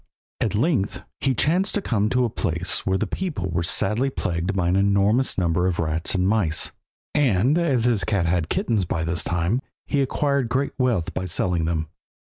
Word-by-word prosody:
At - - 0
length 115 - 0 0.2
he 135 -1 +1
chanced 180 +9 +1
to 205 - +1
come 105 -3 +1
to 125 +1 +2
a - - -1
place 90 -2 -2
where 95 0 +2
the 110 - -1
people 110 - -3
were 85 +1 0
sadly 105 +9 +1
plagued 90 -5 -2
by 90 -3 +1
an 90 - +2
enormous 100 +6 +2
number 90 0 +1
of 90 -2 -1
rats 80 +2 -1
and 90 0 +2
mice, 95 -8 +1 0.4
and 130 -2 +3
as 150 -9 +2
his 115 -5 +2
cat 95 -1 0
had 85 - +1
had 85 -3 -1
kittens 110 -5 0
by 80 -1 -2
this 85 +1 -1
time, 90 +8 0 0.2
he 140 - 0
acquired 140 -2 0
great 135 +3 0
wealth 120 -10 +1
by 95 - -3
selling 90 -1 0
them. 80 -1 -1
100 Hz, 195 wpm, -23 LUFS, 85-125 Hz, 0.4 s, and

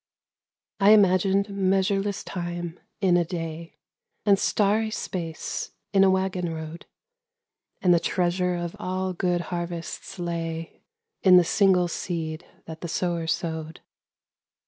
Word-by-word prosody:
I 200 +2 +7
imagined 195 0 +4
measureless 195 +1 +1
time 175 -1 -5 0.2
in 180 -3 +4
a 175 - +3
day, 165 -1 -6 0.5
And 200 -2 +5
starry 215 +2 +2
space 170 -6 -4 0.2
in 195 -1 +6
a 195 - +6
waggon 190 -2 0
road, 160 +1 -7 1.0
And 180 -2 +6
the 170 - +4
treasure 180 +1 0
of 175 -1 -4
all 185 0 -2
good 175 0 0
harvests 175 +2 -5
lay 165 -1 -4 0.4
In 185 -2 +7
the 180 - +7
single 180 0 +3
seed 165 -1 -4 0.2
that 160 0 -9
the 170 - -4
sower 170 0 -1
sowed. 160 -1 -3
175 Hz, 125 wpm, -25 LUFS, 170-190 Hz, 1.0 s, I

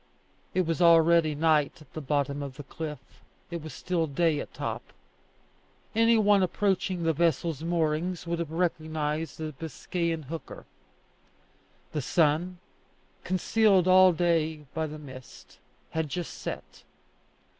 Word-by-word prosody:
It 185 -1 +2
was 165 +2 -1
already 165 -2 +5
night 155 -1 +2
at 155 - -18
the 155 - -5
bottom 145 0 -1
of 140 -2 -6
the 145 - -7
cliff; 150 +1 -6 0.5
it 170 -1 -4
was 155 0 -8
still 170 -3 -1
day 155 +1 +1
at - - -6
top. - - -4 1.1
Any 230 +1 +4
one 205 -2 +4
approaching 185 -1 0
the 165 0 +2
vessel's 165 -1 0
moorings 165 +1 -1
would 170 0 -2
have 170 -3 -3
recognized 160 -2 -2
a 155 -1 -3
Biscayan 165 +2 -3
hooker. 160 +4 -8 1.3
The 150 - -2
sun, 165 +5 +1 0.7
concealed 185 +1 +3
all 185 0 +7
day 160 -3 0
by 160 -1 -1
the 155 0 -7
mist, 130 -4 -12 0.3
had 160 -2 -2
just 175 +4 -4
set. - - -7
165 Hz, 135 wpm, -28 LUFS, 155-175 Hz, 1.3 s, all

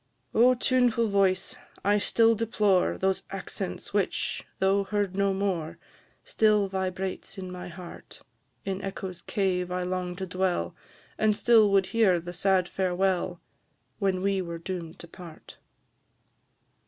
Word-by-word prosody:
Oh, 250 +3 +5
tuneful 240 -2 +2
voice! 195 -2 +2 0.3
I 205 +1 +4
still 230 +2 +4
deplore 210 -4 +1
Those 190 0 +1
accents - - -5
which, - - -1
though 195 +1 +2
heard 200 -2 -1
no 200 0 +2
more, 190 -5 -2 0.5
Still 210 -2 +3
vibrate 190 0 -4
in 185 -1 -6
my 180 0 -7
heart; 175 0 -11 0.4
In 195 0 -3
echo's 190 -2 -6
cave 180 -3 -1
I 180 0 -1
long 180 0 -3
to 190 +1 -4
dwell, 185 0 -1 0.4
And 215 -1 +3
still 220 -1 +5
would 195 -1 +3
hear 205 -6 +4
the 175 +1 -8
sad 185 0 +2
farewell, 185 -1 0 0.6
When 190 -2 0
we 195 -1 +1
were 170 -2 -5
doom'd 170 -1 -6
to 170 - -9
part. 170 -2 -12
190 Hz, 135 wpm, -27 LUFS, 180-200 Hz, 0.6 s, Oh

